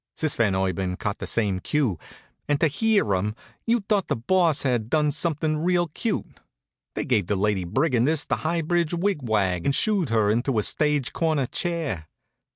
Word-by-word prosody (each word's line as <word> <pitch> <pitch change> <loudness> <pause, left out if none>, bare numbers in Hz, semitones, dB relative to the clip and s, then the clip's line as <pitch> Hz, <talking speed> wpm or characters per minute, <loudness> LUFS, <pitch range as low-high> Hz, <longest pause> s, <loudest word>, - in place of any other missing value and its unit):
Sis 155 -3 +1
Van 105 -5 +2
Urban 95 -1 -1
caught 105 +1 -3
the - - -5
same 100 -5 0
cue, 115 - 0 0.5
and 145 -1 +1
to - - +3
hear 205 - +1
'em 105 +3 -1 0.3
you'd 230 -3 +1
thought 205 -3 +1
the 140 - 0
Boss 165 +5 +2
had 120 -5 0
done 150 0 +2
something 155 0 0
real 175 +1 +1
cute. 220 +8 -4 0.6
They - - -2
gave 105 -8 +1
the 105 - 0
Lady 100 -2 0
Brigandess 135 - +1
the - - -1
High 165 +1 -1
Bridge 170 +1 0
wig 190 0 0
wag 100 -7 0
and 140 - +1
shooed 200 - +1
her 110 -2 +2
into 120 +2 0
a 105 - +2
stage 150 0 +1
corner 155 -5 +1
chair. 155 - -3
140 Hz, 180 wpm, -24 LUFS, 105-165 Hz, 0.6 s, to